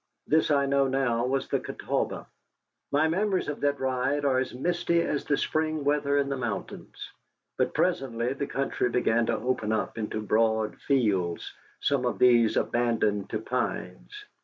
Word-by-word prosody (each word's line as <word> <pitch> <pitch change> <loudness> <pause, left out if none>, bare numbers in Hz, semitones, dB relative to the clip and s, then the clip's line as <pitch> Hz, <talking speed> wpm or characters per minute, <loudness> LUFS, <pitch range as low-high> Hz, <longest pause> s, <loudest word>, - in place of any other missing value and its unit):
This 160 +1 +2
I 140 -2 +3
know 140 0 +2
now 125 -3 0
was 135 +1 -1
the - - 0
Catawba. - - -3 0.7
My 150 +3 +3
memories 190 +3 0
of 145 - -4
that 145 -1 +1
ride 130 +2 0
are 130 -2 +3
as 130 - -2
misty 170 +5 0
as 145 - -2
the 145 - +1
spring 155 -1 -1
weather 145 0 +1
in 140 -1 +1
the 140 -1 -2
mountains. 120 -5 -6 0.4
But - - 0
presently 120 -1 0
the 140 0 -4
country 135 -2 -1
began 120 -1 +1
to 115 - +1
open 110 -2 -1
up 110 +1 -2
into 110 0 -3
broad 110 0 +1
fields, 100 -11 0 0.3
some 140 -3 +1
of - - -2
these 120 -3 +4
abandoned 110 -4 0
to 110 - -1
pines. 125 - -4
130 Hz, 160 wpm, -27 LUFS, 115-145 Hz, 0.7 s, these